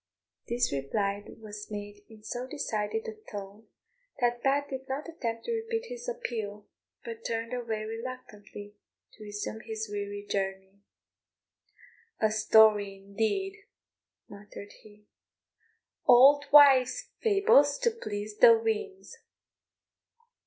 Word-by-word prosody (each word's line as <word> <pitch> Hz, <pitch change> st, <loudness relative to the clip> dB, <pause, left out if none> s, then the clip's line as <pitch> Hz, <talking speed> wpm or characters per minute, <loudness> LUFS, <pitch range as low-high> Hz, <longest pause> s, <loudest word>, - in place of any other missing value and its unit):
This 240 Hz, +1 st, 0 dB
reply 200 Hz, +9 st, -2 dB
was 210 Hz, -1 st, -10 dB
made 205 Hz, 0 st, -8 dB
in 220 Hz, -1 st, -16 dB
so 245 Hz, +3 st, -5 dB
decided 220 Hz, -6 st, -3 dB
a 220 Hz, -, -5 dB, 0.2 s
tone 205 Hz, +1 st, -9 dB, 0.5 s
that 240 Hz, -1 st, +1 dB
Pat 280 Hz, +2 st, +1 dB
did 265 Hz, 0 st, -7 dB
not 275 Hz, +4 st, -4 dB
attempt 230 Hz, -9 st, -5 dB
to -, -, -3 dB
repeat 455 Hz, +1 st, -3 dB
his -, -, -6 dB
appeal, 220 Hz, -, -5 dB, 0.4 s
but 460 Hz, -1 st, -8 dB
turned 230 Hz, +1 st, -3 dB
away 230 Hz, -3 st, -3 dB
reluctantly 225 Hz, -3 st, -8 dB, 0.4 s
to -, -, -13 dB
resume 205 Hz, +1 st, -5 dB
his 220 Hz, -1 st, -5 dB
weary 205 Hz, 0 st, -5 dB
journey. 195 Hz, 0 st, -4 dB, 1.4 s
"A 220 Hz, -1 st, +2 dB
story, 215 Hz, -2 st, +4 dB
indeed," 225 Hz, -, -3 dB, 0.6 s
muttered 205 Hz, 0 st, -11 dB
he. 210 Hz, -1 st, -18 dB, 1.0 s
"Auld 280 Hz, +4 st, +7 dB
wives 275 Hz, -4 st, +6 dB
fables 390 Hz, -, +4 dB
to 470 Hz, -, +1 dB
please 210 Hz, -, -6 dB
the 465 Hz, -2 st, +8 dB
weans!" 430 Hz, -3 st, -4 dB
225 Hz, 115 wpm, -29 LUFS, 205-285 Hz, 1.4 s, the